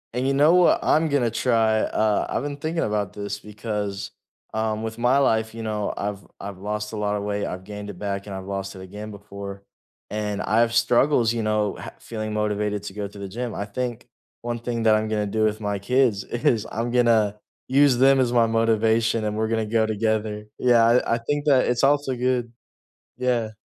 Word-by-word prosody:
And 125 +2 -1
you 135 - +2
know 145 +4 +5
what 180 -1 +5
I'm 160 +1 +3
gonna 140 -6 +1
try? 115 -2 +2
Uh, 110 -1 +1
I've - - -1
been 145 -1 -4
thinking 160 +3 -2
about 105 -3 -1
this, 100 0 -5
because, 105 -2 -4 0.4
um, 110 0 -1
with 110 0 -5
my 120 +3 +3
life, 110 -4 +1
you 115 0 -6
know, 105 -2 -2
I've 100 -1 -4
I've 100 -1 -7
lost 105 +2 -4
a 110 - -5
lotta 105 0 -1
weight, 105 0 -2
I've 90 0 -5
gained 105 +1 -7
it 100 - -8
back, 100 0 -3
and 100 - -5
I've 95 0 -6
lost 95 0 -4
it 95 - -9
again 105 +3 -8
before, 100 -1 -9 0.5
and 105 -1 -2
I 110 - +1
have 115 0 +3
struggles, 120 0 +3
you 115 -1 -2
know, 105 -1 0
ha - - -7
feeling 110 -2 -5
motivated 105 -1 -1
to - - -7
go 100 0 -4
to 100 - -14
the 100 -1 -6
gym. 120 +3 -4
I - - -2
think 120 +2 -4 0.3
one 120 0 -3
thing 120 -1 -3
that 110 -1 +5
I'm 110 0 0
gonna 105 -1 0
do 110 +2 +1
with 110 0 -1
my 105 -1 -2
kids 115 -1 +1
is, 120 -2 0
I'm 115 +1 -3
gonna 115 -4 +3 0.3
use 135 -1 +5
them 135 +1 +5
as 125 -2 +2
my 115 -1 +4
motivation, 115 0 +2
and 105 0 -2
we're 110 0 0
gonna 110 0 0
go 110 +1 +2
together. 110 -1 -1 0.2
Yeah, 120 -2 +5
I 115 0 +3
I - - -1
think 145 +5 -2
that 135 -4 +4
it's 125 +1 0
also 140 -2 +2
good 125 -1 0 0.7
Yeah. 120 -3 0
110 Hz, 210 wpm, -24 LUFS, 105-120 Hz, 0.7 s, know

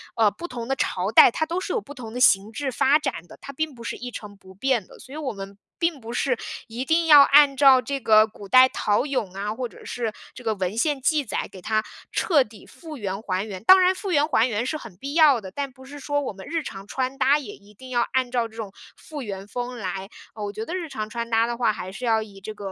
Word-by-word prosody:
呃， 225 -2 +4
不 345 - -8
同 235 -5 -6
的 270 - 0
朝 190 -4 -1
代， - - +8
它 315 - -1
都 340 +3 -2
是 - - -4
有 470 - +1
不 290 - -11
同 225 -4 -9
的 250 - -4
形 200 -3 +4
制 265 +4 -3
发 280 +5 +3
展 175 - -4
的， - - -14
它 275 - -8
并 310 +1 -3
不 235 -1 -12
是 - - -4
一 245 0 -7
成 205 -2 -9
不 190 -1 -16
变 235 0 0
的。 - - -17
所 260 - -13
以 - - -6
我 275 -6 -3
们 195 0 -9 0.2
并 335 -4 0
不 230 0 -8
是， 250 -1 0 0.3
一 240 +4 -5
定 325 +2 +2
要 295 -2 +10
按 280 -1 +6
照 270 -3 +7
这 275 +1 -3
个 215 -2 +5
古 205 -2 -12
代 255 +4 +7
陶 205 0 +1
俑 255 -10 -3
啊， 210 +2 -2
或 250 +2 -4
者 - - -16
是 230 -3 -4 0.2
这 - - -11
个 220 -2 0
文 190 +2 -3
献 285 +2 0
记 295 +1 +1
载， - - -3
给 185 - -11
它 215 +3 0 0.3
彻 315 -7 +3
底 215 0 -16
复 320 -3 -11
原、 195 -1 -4
还 190 -1 -2
原。 195 -3 -7
当 375 +5 +8
然 365 +1 +4
复 380 0 -5
原、 290 -1 +4
还 250 -4 +3
原 230 0 -2
是 310 +4 -2
很 230 -11 -11
必 275 +9 -7
要 300 -7 +5
的， 190 -2 -9
但 280 +2 -4
不 260 0 -16
是 285 +2 -10
说 290 +1 -1
我 265 - -4
们 190 -1 -11
日 330 -1 -2
常 195 -5 -8
穿 260 +2 -3
搭 280 +1 +4
也 245 -9 -7
一 205 +1 -20
定 260 +5 -13
要 240 -2 +1
按 255 -2 +1
照 240 -2 0
这 220 - -19
种 220 -4 -6 0.2
复 300 -3 -9
原 195 -2 -6
风 245 +3 -5
来。 195 -1 -5 0.3
呃， 210 -1 -5
我 205 - -5
觉 215 +2 -5
得 340 - -6
日 355 -3 -3
常 215 -6 -5
穿 235 +1 -4
搭 225 0 +3
的 235 0 -3
话 230 -3 +2
还 185 -2 -7
是 225 +6 -6
要 225 -2 +2
以 200 -2 -13
这 215 +3 -7
个 200 -2 -7
240 Hz, 295 characters per minute, -24 LUFS, 210-280 Hz, 0.3 s, 要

